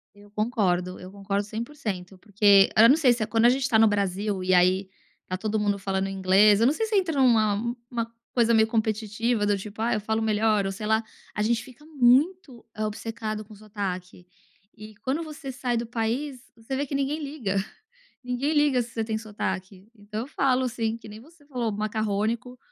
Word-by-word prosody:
Eu 205 Hz, 0 st, -17 dB
concordo, 200 Hz, -5 st, 0 dB
eu 185 Hz, -, -9 dB
concordo 200 Hz, 0 st, -2 dB
100% 210 Hz, -5 st, -6 dB
porque 200 Hz, -1 st, +5 dB
eu 225 Hz, +1 st, +8 dB
não 275 Hz, -, +6 dB
sei 275 Hz, -6 st, +4 dB
se 235 Hz, -, -4 dB
é -, -, 0 dB
quando 225 Hz, +2 st, +3 dB
a -, -, +8 dB
gente 260 Hz, +1 st, +2 dB
tá 225 Hz, -, +3 dB
no 225 Hz, 0 st, +6 dB
Brasil 200 Hz, -1 st, -1 dB
e 185 Hz, -, +1 dB
aí 185 Hz, +2 st, +3 dB, 0.4 s
tá 185 Hz, -, -4 dB
todo 215 Hz, +2 st, -1 dB
mundo 205 Hz, -1 st, 0 dB
falando 195 Hz, 0 st, -1 dB
inglês, 195 Hz, +2 st, +4 dB
eu 230 Hz, -, +5 dB
não 270 Hz, -, +4 dB
sei 445 Hz, -, -1 dB
se 435 Hz, -, -3 dB
entra 345 Hz, -7 st, +1 dB
numa 230 Hz, -2 st, +3 dB, 0.2 s
uma 230 Hz, -2 st, -3 dB, 0.2 s
coisa 235 Hz, -2 st, +3 dB
meio 220 Hz, -1 st, +5 dB
competitiva 220 Hz, 0 st, 0 dB
do 205 Hz, 0 st, +2 dB
tipo: 205 Hz, +2 st, -9 dB
"Ah, 230 Hz, +2 st, +1 dB
eu 215 Hz, -, -1 dB
falo 220 Hz, +2 st, -1 dB
melhor 215 Hz, -2 st, +2 dB
ou 195 Hz, -, -2 dB
sei 210 Hz, +2 st, -6 dB
lá," 220 Hz, +1 st, +2 dB, 0.3 s
a 210 Hz, -, -1 dB
gente 230 Hz, +2 st, 0 dB
fica 265 Hz, +3 st, -16 dB
muito 275 Hz, 0 st, +2 dB
obcecado 215 Hz, 0 st, -4 dB
com 215 Hz, +1 st, -14 dB
o -, -, -15 dB
sotaque. 190 Hz, -4 st, -6 dB, 0.5 s
E 215 Hz, 0 st, -11 dB
quando 270 Hz, +9 st, -2 dB
você 300 Hz, -3 st, -7 dB
sai 250 Hz, -2 st, -2 dB
do 235 Hz, -, -3 dB
país, 245 Hz, +5 st, -2 dB, 0.2 s
você 230 Hz, +4 st, -5 dB
vê 285 Hz, +2 st, -1 dB
que 280 Hz, -, -6 dB
ninguém 280 Hz, +3 st, -1 dB
liga, 275 Hz, -9 st, -3 dB, 0.7 s
ninguém 250 Hz, +5 st, -1 dB
liga 295 Hz, -4 st, +3 dB
se 235 Hz, -, -7 dB
você 225 Hz, -, -2 dB
tem 220 Hz, 0 st, -2 dB
sotaque, 195 Hz, -3 st, -5 dB
então 210 Hz, 0 st, -6 dB
eu 245 Hz, -, -6 dB
falo 265 Hz, -3 st, +1 dB
assim 230 Hz, -2 st, -2 dB
que 230 Hz, -, -13 dB
nem 215 Hz, 0 st, -10 dB
você 300 Hz, +4 st, -19 dB
falou 245 Hz, -6 st, -2 dB
macarrônico, 215 Hz, +3 st, -2 dB
220 Hz, 205 wpm, -26 LUFS, 205-245 Hz, 0.7 s, eu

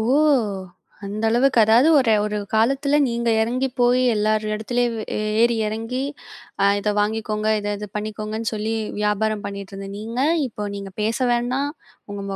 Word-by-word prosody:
ஓ! -, -, 0 dB, 1.0 s
அந்த 205 Hz, +2 st, -5 dB
அளவுக்கு 245 Hz, +2 st, +3 dB
அதாவது 230 Hz, +7 st, +5 dB
ஒரு 235 Hz, -4 st, +3 dB
ஒரு 210 Hz, 0 st, -2 dB, 0.2 s
காலத்துல 275 Hz, +6 st, +2 dB
நீங்க 235 Hz, -1 st, 0 dB
இறங்கி 250 Hz, +4 st, 0 dB
போய் 245 Hz, +1 st, +4 dB
எல்லார் 215 Hz, 0 st, +1 dB
இடத்திலயும் 240 Hz, +2 st, -1 dB
வே 215 Hz, -, -4 dB, 0.4 s
ஏறி 235 Hz, 0 st, +4 dB
இறங்கி 225 Hz, +4 st, -3 dB, 0.6 s
அ -, -, +5 dB
இத 210 Hz, -, 0 dB
வாங்கிக்கோங்க, 215 Hz, 0 st, -1 dB
இதை 205 Hz, 0 st, -2 dB
இதை 210 Hz, 0 st, -7 dB
பண்ணிக்கோங்கன்னு 215 Hz, +1 st, -3 dB
சொல்லி 215 Hz, +1 st, -2 dB, 0.3 s
வியாபாரம் 210 Hz, 0 st, 0 dB
பண்ணிட்டு 200 Hz, 0 st, -7 dB
இருந்த 195 Hz, 0 st, -7 dB
நீங்க, 230 Hz, +4 st, -4 dB, 0.3 s
இப்போ 210 Hz, -3 st, -5 dB
நீங்கப் 195 Hz, 0 st, -8 dB
பேச 220 Hz, +2 st, 0 dB
வேண்டாம், 250 Hz, +4 st, 0 dB, 0.4 s
உங்க 200 Hz, 0 st, -5 dB
220 Hz, 150 wpm, -22 LUFS, 210-240 Hz, 1.0 s, அதாவது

